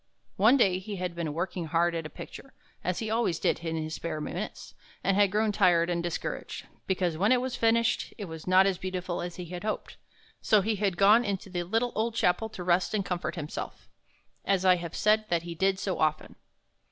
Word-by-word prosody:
One 220 +8 +6
day 190 -7 +3
he 200 +2 -6
had 180 -2 -3
been 170 -3 -3
working 175 +2 -3
hard 170 +2 +1
at 165 -2 -3
a - - -15
picture, 270 - -11 0.3
as 180 0 -1
he 220 -1 -3
always 225 -7 +1
did - - +1
in 165 -1 -3
his 155 0 -3
spare 165 -2 -4
minutes, 150 - -6 0.3
and 195 0 +2
had 205 0 +4
grown 215 +2 +1
tired 175 -4 +3
and 170 -1 0
discouraged, 170 -1 -4 0.2
because 180 -4 0
when 205 +5 +3
it 255 - +5
was 255 0 -3
finished 230 0 +2
it 210 - -5
was 160 -2 -9
not 185 +1 +6
as 190 -2 0
beautiful 185 -1 -3
as 175 0 -5
he 180 - -6
had 175 +2 -7
hoped. 215 0 -4 0.4
So 215 -2 +4
he 215 +2 -1
had 195 -3 0
gone 210 +4 +6
into 195 -3 -3
the 175 -1 -1
little 225 +7 0
old 225 +1 -1
chapel 220 +2 +1
to 185 -4 -7
rest 175 +3 +2
and 200 -2 -1
comfort 180 -2 -3
himself, 150 -3 -6 0.6
as 190 -1 +1
I 185 -1 +6
have 170 -1 -6
said 215 +1 +3
that 170 -1 +1
he 170 0 -6
did 190 +3 +1
so 190 -1 -2
often. 155 -1 0
185 Hz, 215 wpm, -28 LUFS, 170-210 Hz, 0.6 s, One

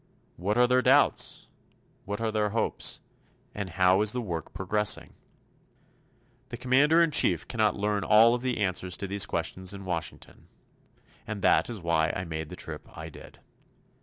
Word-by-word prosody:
What 100 +6 -2
are 125 - +6
their 125 +1 +3
doubts? - - +2 0.6
What 105 +2 -4
are 115 -1 -1
their 105 -1 0
hopes? 115 +2 -1 0.5
And 100 -2 -5
how 95 +2 +3
is 105 0 +3
the 125 - -2
work 85 -7 -5
progressing? 105 +3 -1 1.4
The 120 - -6
Commander 140 +7 +4
in 165 - +1
Chief 150 - +3
cannot 110 -4 +1
learn 105 0 -1
all 110 +2 +6
of 120 - -2
the 130 -1 -1
answers 90 -3 -1
to - - -4
these 100 +1 0
questions 95 +1 -2
in 100 -1 -9
Washington. 85 -2 -6 0.8
And 105 -3 -5
that - - +3
is 110 -7 -7
why 80 -1 +1
I 90 - -4
made 80 -2 -5
the - - -8
trip - - -8
I 80 +1 -7
did. - - -14
105 Hz, 165 wpm, -27 LUFS, 90-115 Hz, 1.4 s, are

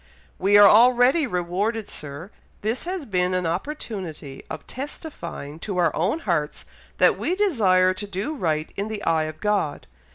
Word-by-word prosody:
"We 200 +2 +5
are 205 0 +9
already 250 +7 +5
rewarded, 200 +4 -2
Sir! 150 +6 -7 0.3
This 225 +8 -1
has 360 -3 -4
been 185 -3 0
an 180 -1 -1
opportunity 175 - -5
of - - -7
testifying 265 - -7
to 195 +1 -4
our 170 -4 +2
own 200 - 0
hearts 160 -6 -2 0.3
that - - +4
we 360 - 0
desire 200 - +3
to 205 +2 -6
do 200 +9 -3
right 160 - -2
in 200 +1 -3
the 215 -1 -5
eye 160 -1 +2
of 155 0 -7
God. 205 -8 -1
195 Hz, 160 wpm, -24 LUFS, 170-235 Hz, 0.3 s, are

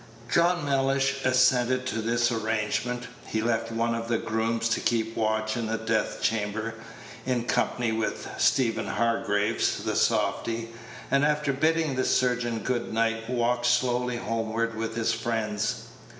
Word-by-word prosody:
John 170 -2 +3
Mellish 135 0 +1
assented 130 0 +3
to 115 -3 -2
this 120 +2 +1
arrangement. 115 +2 -1 0.2
He 110 0 -1
left 115 -1 0
one 115 +1 0
of 115 0 -3
the 115 -1 +1
grooms 115 +1 -1
to 115 - +1
keep 115 -1 0
watch 110 0 0
in 115 -2 -2
the 115 +1 -1
death 110 -1 -1
chamber, 105 +1 -1 0.5
in 125 -1 0
company 120 -1 0
with 110 -1 -2
Stephen 120 -4 +2
Hargraves, 110 -1 0
the - - -1
softy; 115 0 0 0.4
and, 140 +1 +4
after 150 -1 +1
bidding 160 +1 +1
the 130 - +2
surgeon 120 -3 +1
good 125 -2 -1
night, 115 0 0
walked 120 0 +1
slowly 125 0 +1
homeward 115 0 -2
with 115 0 -3
his 115 -1 +1
friends. 110 -2 -2
115 Hz, 145 wpm, -27 LUFS, 115-125 Hz, 0.5 s, and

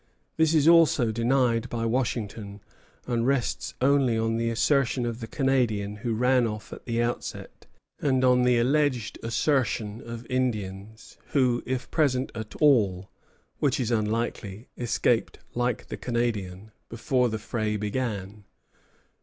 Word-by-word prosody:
This 160 0 +3
is 155 -1 +4
also 165 -9 +5
denied 115 0 +1
by 115 -1 -2
Washington, 110 -4 -2 0.5
and 120 -1 0
rests 135 -3 -1
only 135 -3 +3
on 115 0 0
the 115 0 0
assertion 125 +1 +1
of 115 -1 -3
the 115 - -6
Canadian 115 -7 0
who 115 0 -2
ran 125 +1 +3
off 110 0 -6
at - - -11
the 115 -1 0
outset, 120 +1 -5 0.3
and 130 -2 +2
on 125 0 +4
the 125 -1 +3
alleged 130 -2 +1
assertion 115 -3 0
of 115 0 -8
Indians 110 -4 -4
who, 125 -4 +2
if 130 -1 -3
present 135 -5 +1
at 110 -2 -7
all, 100 - +2 0.5
which 140 -3 +1
is 120 -2 -1
unlikely, 110 -1 -2
escaped 120 -1 0 0.2
like 120 0 -1
the - - -7
Canadian 110 -5 -3 0.2
before 125 +2 0
the 110 - -2
fray 110 -1 -2
began. 105 -2 -4
120 Hz, 135 wpm, -26 LUFS, 110-130 Hz, 0.5 s, also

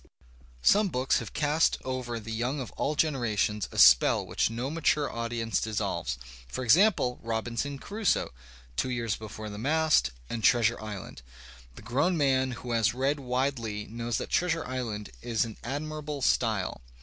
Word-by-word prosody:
Some 210 0 +5
books 130 -6 +1
have 115 - -7
cast 150 +2 +2
over 125 -3 -3
the 115 +1 -8
young 120 +6 -1
of 130 - -5
all 150 - -2
generations 115 -9 0
a - - -9
spell 60 0 +6
which - - 0
no 120 +5 -3
mature 155 -2 +2
experience 115 -2 -2
dissolves, 110 - -2 0.3
for 130 - -4
example, 145 - +4
'^Robinson 115 +5 -2
Crusoe," 205 - 0 0.4
"Two 130 - 0
Years 115 -4 -1
Before 110 0 -8
the 105 -1 -7
Mast," 155 - +3 0.2
and 115 - -4
"Treasiu^ 115 -1 +3
Island." 105 - -7 0.5
The - - -12
grown 140 - +1
man 130 -3 +2
who 120 - -4
has 115 0 +2
read 135 +3 0
widely 125 -5 -2
knows 115 0 -2
that - - -5
"Treasure 165 -2 +1
Island" 120 -5 -4
is 115 -1 0
in 110 - -8
admirable 150 +2 -4
style. 110 - +1
125 Hz, 155 wpm, -28 LUFS, 110-145 Hz, 0.5 s, spell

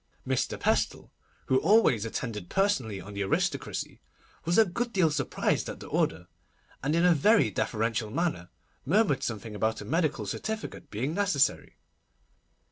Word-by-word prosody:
Mr. - - -1
Pestle, - - 0 0.3
who 130 - +3
always 155 - +4
attended 110 -5 -4
personally 130 - 0
on 100 +1 -10
the 100 - -4
aristocracy, 95 - -2 0.4
was 170 +2 +2
a 225 - +7
good 235 +6 -3
deal 180 -7 +3
surprised 140 -3 -1
at - - -7
the - - -9
order, - - -1 0.6
and 145 +4 0
in 170 +1 +3
a 180 - +6
very 155 - +4
deferential 110 +2 -1
manner 150 - -2 0.3
murmured 185 -2 +2
something 110 -1 -4
about 110 +1 -1
a 105 - -7
medical 155 - 0
certificate 220 +2 -5
being 125 +9 -2
necessary. 190 -7 +1
140 Hz, 145 wpm, -28 LUFS, 110-185 Hz, 0.6 s, a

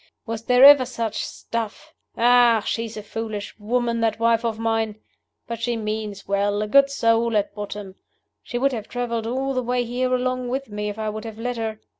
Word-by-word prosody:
Was 225 -1 -5
there 250 +1 +5
ever 285 -2 +9
such 230 -4 -3
stuff? 230 -2 -5 0.2
Ah, 240 -2 +5
she's 225 -1 -3
a 210 - -6
foolish 215 -1 -6
woman, 235 +2 0
that 220 -2 +1
wife 230 0 +3
of 230 -2 -1
mine! 225 -1 -1 0.5
But 235 -1 -6
she 240 0 -1
means 215 -2 -4
well 200 +1 +1
a - - -3
good 275 +5 +5
soul 230 -4 +2
at 205 -1 -1
bottom. 205 -1 -6 0.5
She 240 - -5
would 275 +3 +2
have 220 -4 -5
traveled 235 -2 -2
all 265 +3 -1
the 255 - 0
way 245 0 0
here 250 +2 -1
along 255 0 0
with 265 0 -3
me 210 0 -3
if 205 - -6
I 215 -1 -2
would 215 0 -5
have 220 -1 -7
let 245 +1 -3
her. 220 -1 -3
230 Hz, 200 wpm, -23 LUFS, 215-245 Hz, 0.5 s, ever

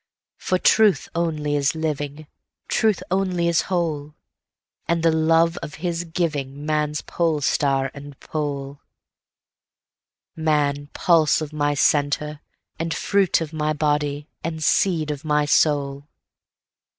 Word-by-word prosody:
For 185 - 0
truth 210 +1 +3
only 155 -3 -1
is 145 +2 +1
living, 150 -1 -3 0.4
Truth 220 -5 +1
only 185 -2 +1
is 170 -1 +3
whole, 155 -5 -2 0.7
And 170 -1 0
the 165 - +5
love 165 +1 +3
of 150 - -7
his 170 +1 -3
givingMan's 150 -2 -2
polestar 145 -4 0
and 140 -1 -11
pole; 140 -2 -4 1.5
Man, 145 -2 0
pulse 165 -3 +3
of 155 -1 -6
my 145 -1 0
centre, 145 +1 +1 0.4
and 165 -1 -2
fruit 195 -4 +2
of 160 -1 -5
my 155 0 0
body, 145 -1 -1 0.2
and 160 -1 -4
seed 160 -2 +2
of 145 -2 -6
my 150 -1 +1
soul. 145 -1 +1
155 Hz, 115 wpm, -22 LUFS, 145-165 Hz, 1.5 s, the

